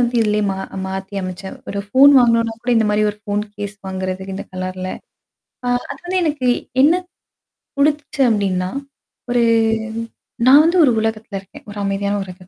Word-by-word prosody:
வந்து 245 0 +1
இதிலயே 210 0 +1
மா 190 - -3 0.3
மாத்தி 190 +1 -6
அமைச்சேன். 185 +1 -6
ஒரு 200 - -4
ஃபோன் 275 +5 +7
வாங்கனோனா 230 -2 +3
கூட 245 - -1
இந்த 220 -1 +3
மாரி 210 0 +2
ஒரு 205 - -13
ஃபோன் 205 -1 -1
கேஸ் 205 0 -6
வாங்குறதுக்கு 190 0 -4
இந்த - - -6
கலர்ல. 185 0 -4 0.8
ஆ - - -1 0.3
அதாவது 350 +7 -6
எனக்கு 290 -5 -1 0.3
என்ன 300 +5 +6 0.8
குடித்துச்சு 295 0 +1
அப்படின்னா, 190 -4 0 0.6
ஒரு 240 -1 +3 1.0
நான் 280 +3 +9
வந்து 340 +3 +2
ஒரு 265 - +5
உலகத்தல 220 -2 -3
இருக்கேன். 195 - -16
ஒரு 205 - -9
அமைதியான 200 +1 -1
ஒரு 185 - -9
210 Hz, 155 wpm, -19 LUFS, 190-250 Hz, 1.0 s, நான்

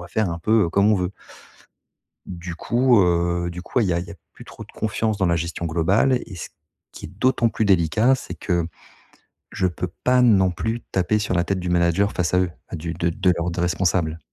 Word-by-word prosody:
va 85 - -9
faire 110 -1 0
un 85 - -4
peu, 110 +3 +3
heu, 85 - -1
comme 100 +4 +3
on 105 - +3
veut». 90 -1 -1 1.2
Du 90 -1 -7
coup, 120 +5 +3
heu, 85 -1 +1
du 90 +1 -7
coup 125 - -1
il 110 - +2
y 90 - +1
a - - +1
y 85 +1 -6
a - - -8 0.2
plus - - -13
trop - - -11
de - - -19
confiance 110 0 -1
dans 95 -2 +1
la 85 -1 +2
gestion 85 +1 -4
globale 95 +10 +2
et 95 - -10
ce - - -7 0.4
qui - - -9
est - - -10
d'autant 120 +4 +1
plus 110 - -1
délicat, 100 - +3
c'est 130 - -6
que, 85 -3 -1 0.9
je 95 -2 0
peux 90 +1 -4 0.2
pas 125 0 +3
non 100 -6 +4
plus 110 +6 -3
taper 95 +3 +1
sur 105 - -2
la 85 - +1
tête 95 -1 -2
du 90 - -4
manager 85 +3 +2
face 90 0 -1
à 90 - +4
eux, 90 - 0 0.2
à - - -8
du 85 +2 -5
de 85 +1 -1
de 90 +2 +2
leur 85 +1 -1
de 90 - -3
responsable. 85 -2 0
90 Hz, 235 wpm, -22 LUFS, 85-105 Hz, 1.2 s, non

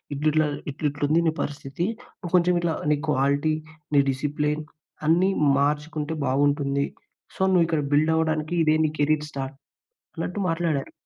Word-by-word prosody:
"ఇట్లిట్లా 155 +1 +2 0.2
ఇట్లిట్ల 145 0 -3
ఉంది 165 +2 +4
నీ 160 - +2
పరిస్థితి, 145 +4 -3 0.3
నువ్వు 180 -2 -7
కొంచెం 180 0 +4
ఇట్లా 165 -2 0 0.2
నీ 150 - +3
క్వాలిటీ, 140 +3 +2 0.6
డిసిప్లిన్ 150 +2 -1 0.4
అన్నీ 175 +4 +4 0.3
మార్చుకుంటే 150 +2 -1
బాగుంటుంది. 140 +1 +1 0.5
సో, - - -6
నువ్వు 175 -2 +5
ఇక్కడ 160 -3 0
బిల్డ్ 155 +2 +4
అవ్వడానికి 155 0 0
ఇదే 155 0 +4
నీ 150 - 0
కెరీర్ 150 +1 +2
స్టార్ట్" 135 0 -5 0.6
అన్నట్టు 190 - -3
మాట్లాడారు. 165 -4 -1
150 Hz, 135 wpm, -25 LUFS, 145-160 Hz, 0.6 s, నువ్వు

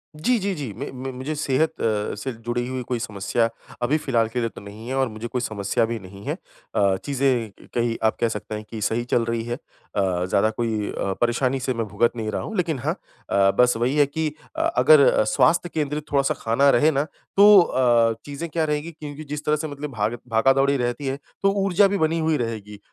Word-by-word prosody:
जी, 235 +11 +1
जी, 200 0 -1
जी 140 -9 -5
मे 140 - -5
म 130 +1 -6
मुझे 135 +4 -3
सेहत 155 +2 0
अ, 105 -2 0
से 130 - -4
जुड़ी 120 +1 -1
हुई 130 0 -3
कोई 125 -2 -1
समस्या 115 +1 -1 0.3
अभी 140 +6 +2
फिलहाल 120 -7 +1
के 125 +2 -2
लिए 115 -1 0
तो - - -12
नहीं 105 +3 -10
है 130 - -2
और 135 -1 +2
मुझे 110 +2 -6
कोई 125 +1 -2
समस्या 110 -1 0
भी 115 0 -3
नहीं 100 +1 -12
है। - - -1 0.4
अ, 100 -2 +3
चीज़ें 130 -6 +1
क - - -16
कहीं 120 -1 +1
आप 110 - +3
कह 115 - +2
सकते 105 0 -5
हैं 105 - -6
कि 110 -2 -6
सही 115 +3 0
चल 115 - +3
रही 115 -1 -1
है 120 +1 -3
अ, 95 -8 -3
ज़्यादा 100 +4 +2
कोई 110 -2 -2
अ, 95 - -2
परेशानी 125 +2 +1
से 130 0 -1
मैं 115 -1 -2
भुगत 105 +4 +2
नहीं 110 -2 -3
रहा - - -2
हूँ 220 - -6
लेकिन 165 -6 0
हाँ 150 +6 -1 0.4
अ, 95 0 +4
बस 125 0 +6
वही 125 +5 0
है 145 - +6
कि 155 +3 -2 0.3
अ, 320 - -1 0.2
अगर 145 -7 +6
स्वास्थ्य 155 +9 +3
केंद्रित 150 -1 -3
थोड़ा-सा 140 -1 +2
खाना 115 +5 +3
रहे 150 +3 +4
ना 140 -1 +1 0.3
तो 205 0 +9
अ, 120 -7 +3
चीज़ें 145 +3 -5
क्या 160 0 0
रहेंगी 150 +2 -2
क्योंकि 150 -1 -8
जिस 150 0 -6
तरह 150 - +3
से 155 +1 -3
मतलब 145 0 -6
भाग 110 0 -1
भागा-दौड़ी 135 +5 +3
रहती 120 +2 -2
है 135 - -1 0.3
तो 195 - +5
ऊर्जा 195 +1 +4
भी 200 - -1
बनी 160 -1 +1
हुई 160 -1 +1
रहेगी। 105 -3 -5
125 Hz, 225 wpm, -23 LUFS, 115-150 Hz, 0.4 s, तो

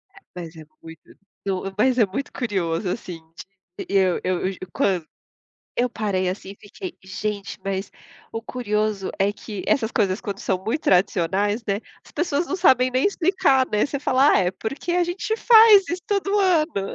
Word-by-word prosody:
É - - -14 0.2
mas 170 -2 -8
é 155 -1 -11 0.2
muito 160 -1 -12 0.4
to 195 0 -2
mas 255 +4 +3
é 225 - +5
muito 200 +8 -5
curioso 185 -6 -2
assim 180 -4 -5 0.6
de - - -5
e 200 - -2
eu 185 -2 +2
eu 185 +1 -1
g 190 - -10 0.2
quan 185 -4 +1 0.7
eu 245 +1 +1
parei, 200 -5 -1
assim, 190 +1 -5
e 200 - -11
fiquei: 350 - -8
"Gente". 200 +1 -5
Mas, 195 0 -3 0.4
o 225 - -5
curioso 215 -4 -2
é 195 +1 +2
que 205 -1 -8
essas 245 -7 +1
coisas 195 -2 0
quando 200 -4 -5
são 190 -2 -2
muito 245 +9 -2
tradicionais, 195 +4 +1
né, 200 0 -1 0.2
as - - -18
pessoas 335 0 -1
não 375 - -2
sabem 255 -7 +4
nem 255 +8 +2
explicar, 355 -9 +2
né, 210 0 +2
você 280 0 -4
fala: 270 +1 +3
"Ah, - - +5
é 180 -2 +2
porque 275 - -4
a 355 0 +3
gente 350 +5 -2
faz 445 -4 +7
isso 350 +2 -3
todo 405 0 0
ano". 320 - +1
210 Hz, 185 wpm, -23 LUFS, 190-290 Hz, 0.7 s, faz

